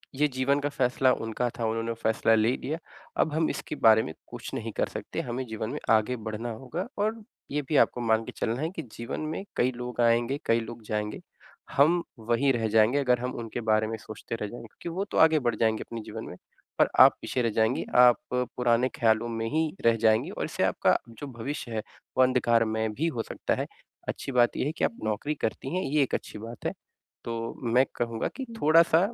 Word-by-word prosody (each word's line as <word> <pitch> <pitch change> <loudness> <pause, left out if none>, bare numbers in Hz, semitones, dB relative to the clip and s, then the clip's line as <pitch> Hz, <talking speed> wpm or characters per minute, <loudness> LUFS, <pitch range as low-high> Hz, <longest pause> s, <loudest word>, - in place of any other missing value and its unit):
ये 150 +2 +3
जीवन 135 +1 +1
का 145 0 -1
फैसला 130 -1 +2
उनका 115 +2 -2
था, 115 - 0
उन्होंने 115 +1 -1
फैसला 115 0 +2
ले 110 +3 +3
लिया। 155 +3 -3 0.4
अब 155 - 0
हम 160 +1 +1
इसके - - -4
बारे 110 0 +7
में 80 - -6
कुछ - - -8
नहीं - - -4
कर - - +1
सकते, - - -4
हमें 125 +2 -4
जीवन 110 -1 -4
में - - -4
आगे 110 +3 +3
बढ़ना 110 +2 -3
होगा। 135 - -5
और 215 +2 -1 0.3
ये 150 +1 0
भी 150 - +3
आपको 125 - +3
मान 110 -1 +2
के - - -6
चलना 115 +5 -1
है 160 - 0
कि - - -3 0.2
जीवन 115 +5 -4
में 160 - -4
कई 125 +1 +2
लोग 125 -1 -4
आएँगे, 120 +4 +2
कई 115 0 +3
लोग 115 0 -8
जाएँगे, 105 0 -3 0.5
हम 165 +5 +4 0.2
वहीं 120 +5 +2
रह 115 -2 0
जाएँगे 110 +5 +4
अगर 125 -3 +2
हम 125 +1 -3
उनके 115 +1 -5
बारे 110 0 +3
में 110 - -3
सोचते 110 +1 -7
रह 105 -2 -4
जाएँगे 115 +2 -9
क्योंकि 170 - -8
वो 195 - 0
तो - - -5
आगे 160 -1 +6
बढ़ 120 -4 0
जाएँगे 110 -1 +1
अपने 115 -1 -6
जीवन 110 +1 -7
में, - - -8 0.4
पर - - +5
आप - - +9
पीछे 125 - -1
रह 115 - +2
जाएँगी, 110 +4 +1
आप 125 -1 +7
पुराने 125 0 +1
ख़्यालों 115 0 +3
में 115 -1 -3
ही 160 +1 0
रह 115 0 +6
जाएँगी, 110 0 +3
और - - -3
इससे - - -2
आपका - - +3
जो 115 +5 -8
भविष्य 125 0 -5
है, 110 -1 -1 0.4
वो 130 - +7
अंधकारमय 115 -3 +2
भी 140 +10 -1
हो 120 -9 -2
सकता - - -2
है। - - -2 0.4
अच्छी - - -4
बात 120 -1 +4
ये - - 0
है 145 - 0
कि - - -4
आप - - 0
नौकरी 110 +8 -1
करती 130 +5 -3
हैं, 185 - +1
ये 145 +1 +2
एक 130 - -4
अच्छी 105 - -6
बात 115 +2 -9
है। - - +1 0.5
तो 115 0 -3 0.2
मैं 130 +2 +6
कहूँगा 115 -1 -1
कि 265 - -4 0.2
थोड़ा-सा 160 +1 +6
120 Hz, 220 wpm, -27 LUFS, 110-135 Hz, 0.5 s, आप